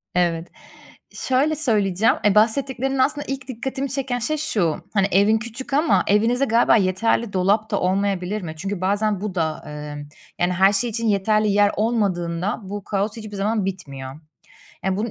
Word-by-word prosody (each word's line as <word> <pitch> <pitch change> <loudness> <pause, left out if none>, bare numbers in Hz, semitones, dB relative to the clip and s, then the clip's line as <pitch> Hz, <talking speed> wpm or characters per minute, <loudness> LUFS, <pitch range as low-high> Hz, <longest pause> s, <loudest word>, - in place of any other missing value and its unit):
Evet. 170 -1 +1 0.6
Şöyle 275 +4 0
söyleyeceğim, 215 - +2
eee, 210 -1 +4
bahsettiklerin 265 +4 +2
aslında 290 +3 +1
ilk 270 -1 -5
dikkatimi 265 +2 -4
çeken 260 -2 -2
şey 305 +7 -1
şu, 210 - 0
hani, 195 -2 +3
evin 205 +3 +4
küçük 235 +4 -7
ama 305 +4 +3
evinizde 230 +6 +3
galiba 230 -1 +4
yeterli 210 +2 +1
dolap 200 +4 +1
da 205 - +1
olmayabilir 195 +1 0
mi? 165 -3 -6
Çünkü 195 +2 -4
bazen 205 +1 0
bu 205 -3 -4
da, 160 -3 -2
emm, 150 0 -7 0.3
yani, 175 +1 +1
her 190 +3 +4
şey 235 +4 +1
için 230 +1 -2
yeterli 215 +1 +2
yer 205 0 +4
olmadığında 195 -4 -1
bu 200 +1 -6
kaos 205 +2 -2
hiçbir 215 -2 -8
zaman 205 +1 0
bitmiyor. 140 -7 -6 0.7
Ya, 190 -1 0
bunun 220 +3 -2
205 Hz, 165 wpm, -22 LUFS, 185-235 Hz, 0.7 s, eee